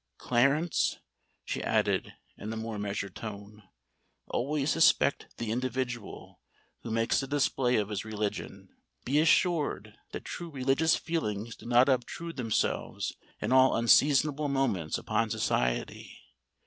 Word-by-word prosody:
Clarence," 140 +7 +1 0.5
she - - -3
added, - - 0 0.2
in 110 - -6
a 110 - -4
more 110 -1 -4
measured 100 -2 -4
tone, 105 -1 -8 0.7
"always 145 +3 -1
suspect 165 -3 +3
the 115 -2 -3
individual 125 -2 -4 0.4
who - - -7
makes 115 +3 +1
a 135 - -5
display 135 -3 +1
of 105 -1 0
his 105 -2 -3
religion. 105 -1 -5 0.4
Be 140 +4 +2
assured 155 - +2 0.2
that - - -7
true 175 -1 -6
religious 140 +3 +2
feelings 115 -10 -3
do - - -13
not 120 +2 +5
obtrude 140 +6 -2
themselves 115 -4 -1 0.3
in - - -2
all 130 0 +5
unseasonable 145 +5 +4
moments 135 - 0
upon 110 +1 -1
society. 60 - -1
125 Hz, 125 wpm, -29 LUFS, 110-140 Hz, 0.7 s, not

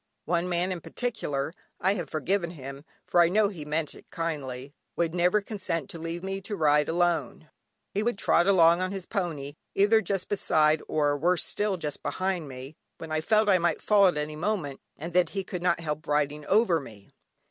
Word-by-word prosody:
One 175 +2 0
man 175 +1 0
in 180 -2 -4
particular 155 - -3 0.3
(I 190 - +2
have 190 - -4
forgiven 170 +3 -1
him, 140 -3 -9 0.2
for 175 - +4
I 170 - +5
know 205 +2 +3
he 165 -7 -8
meant 150 +1 -2
it - - -16
kindly) 140 -5 -4 0.2
would 165 -1 0
never 180 +4 +3
consent 185 - -3
to 165 - -8
leave 165 +2 -5
me 195 0 -3
to 205 +2 -4
ride 150 -3 +3
alone. 165 -3 0 0.4
He 205 - 0
would 235 -1 0
trot 175 -2 +3
along 170 -3 +5
on 185 0 -1
his 195 -2 -5
pony, 155 -8 -3 0.2
either 210 +3 +5
just 195 -1 -2
beside, 155 -6 +2
or 145 -2 +1
worse 175 +4 +2
still 205 -2 -1
just 150 -4 -5
behind 185 -4 -2
me, 135 +3 -9 0.2
when 160 - -8
I 155 0 0
felt 215 +5 +3
I 190 -3 +5
might 170 0 +1
fall 205 -2 +5
at 175 - +1
any 150 +1 -3
moment, 155 -5 -2 0.2
and 165 +3 -7
that 180 0 +3
he 195 - 0
could 180 -1 -5
not 175 -1 +2
help 155 -1 -4
riding 150 0 0
over 200 -5 +4
me. 105 -8 -13
170 Hz, 200 wpm, -27 LUFS, 150-190 Hz, 0.4 s, I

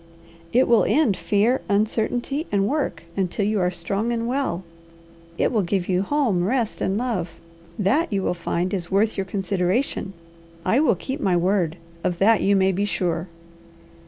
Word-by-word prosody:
"It 255 +3 +4
will 235 -2 +5
end 275 -10 +3
fear, 220 +7 +1
uncertainty, 235 +8 0
and 200 -1 +2
work, 265 - -2
until 195 +1 -1
you 210 0 +1
are 180 -1 +2
strong 195 +6 -2
and 230 -1 -1
well. 250 -9 -1 0.7
It - - +1
will 220 - +2
give 185 0 -1
you 185 -1 +1
home, 225 -6 +1
rest, 230 +2 -1
and 190 +1 0
love, 205 -9 -2 0.4
that 230 - +1
you 195 -2 0
will - - +1
find 175 +1 -2
is 175 -3 -3
worth 210 +3 +2
your 195 - -2
consideration. 195 +3 -1 0.5
I 225 +8 +3
will 285 -8 +3
keep 265 - -5
my 185 -10 +2
word; 175 -2 +1 0.3
of 175 - 0
that 215 +3 +4
you 200 +1 +3
may 190 0 +3
be 195 +2 -1
sure." 175 -3 -1
200 Hz, 170 wpm, -23 LUFS, 185-235 Hz, 0.7 s, will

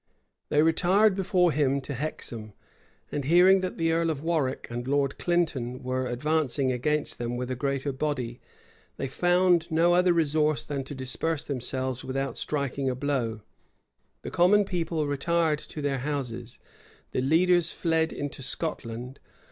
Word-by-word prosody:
They 150 +1 +4
retired 185 +6 +4
before 185 -2 +2
him 140 -2 +1
to 135 +2 -6
Hexham; 120 -6 -5 0.6
and 145 - -2
hearing 180 +6 +6
that 185 -1 -4
the 165 0 +1
earl 165 0 +1
of 150 -2 -3
Warwick 160 -6 0
and 120 +1 -4
Lord 140 0 0
Clinton 150 -8 -1
were 130 0 -1
advancing 140 +1 0
against 150 +5 -1
them 120 0 -2
with 125 +1 -3
a - - -1
greater 140 +1 -1
body, 130 -4 -3 0.6
they 135 - -2
found 175 +3 +2
no 170 +2 +3
other 180 0 +4
resource 155 -2 +2
than 140 -2 -3
to 145 - -7
disperse 140 +4 -2
themselves 130 -1 -2
without 135 +1 -3
striking 140 -2 -2
a 125 - -1
blow. 125 -5 -2 0.8
The - - -6
common 200 +4 +4
people 165 -4 -1
retired 155 +2 +1
to 150 - -7
their 140 -2 0
houses: 125 -4 -4 0.5
the - - 0
leaders 170 +4 +3
fled 160 -1 0
into 145 -1 -5
Scotland. 125 -3 -4
145 Hz, 150 wpm, -27 LUFS, 130-165 Hz, 0.8 s, hearing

